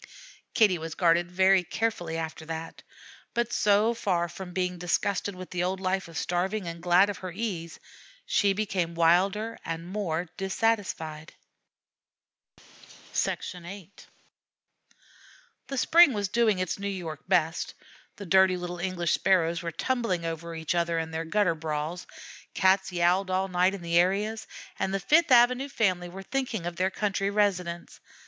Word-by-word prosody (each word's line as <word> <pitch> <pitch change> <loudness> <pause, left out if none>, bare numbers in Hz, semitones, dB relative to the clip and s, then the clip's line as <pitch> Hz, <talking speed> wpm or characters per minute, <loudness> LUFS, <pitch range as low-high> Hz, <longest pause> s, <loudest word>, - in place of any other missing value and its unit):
Kitty 205 -7 +4
was 160 0 -6
guarded 175 0 +3
very 190 +1 +4
carefully 175 -3 -2
after 160 0 -5
that; 165 0 -6 0.5
but 235 0 0
so 210 +3 +3
far 180 -6 0
from 180 +2 -9
being 180 -1 -2
disgusted 185 +3 -1
with 185 0 -9
the 180 -1 -1
old 185 +1 -1
life 190 0 -1
of 165 -2 -9
starving, 185 +4 -1
and 170 0 -6
glad 180 +2 +5
of 200 - -9
her 185 -1 -6
ease, 180 -4 -4 0.5
she 200 -1 +2
became 185 -5 -2
wilder 190 +7 +2
and 165 0 -5
more 180 -3 -2
dissatisfied. 190 -6 -2 1.8
VIII 180 +2 -4 1.8
The 275 - -4
spring 330 +2 +6
was 205 -2 -2
doing 225 -2 +2
its 185 +1 -2
New 200 - -3
York 170 -6 -5
best. 170 -3 +1 0.4
The 200 - -8
dirty 190 0 +4
little 175 0 -5
English 175 -2 -1
Sparrows 170 -3 +2
were 170 -1 -4
tumbling 195 -2 -1
over 165 0 -5
each 160 0 -2
other 170 -1 0
in 160 0 -3
their 160 +1 -3
gutter 180 0 +2
brawls, 160 +2 -4 0.5
Cats 190 0 +3
yowled 180 +2 +2
all 190 +1 0
night 180 +2 +2
in 185 - -9
the 170 0 +3
areas, 210 +5 0 0.3
and 190 - 0
the - - 0
Fifth 310 - +3
Avenue 250 +2 +5
family 185 -8 0
were 190 +2 -9
thinking 245 -6 -3
of 175 0 -4
their 185 +1 +1
country 195 0 -1
residence. 185 -5 -1
185 Hz, 150 wpm, -27 LUFS, 170-200 Hz, 1.8 s, spring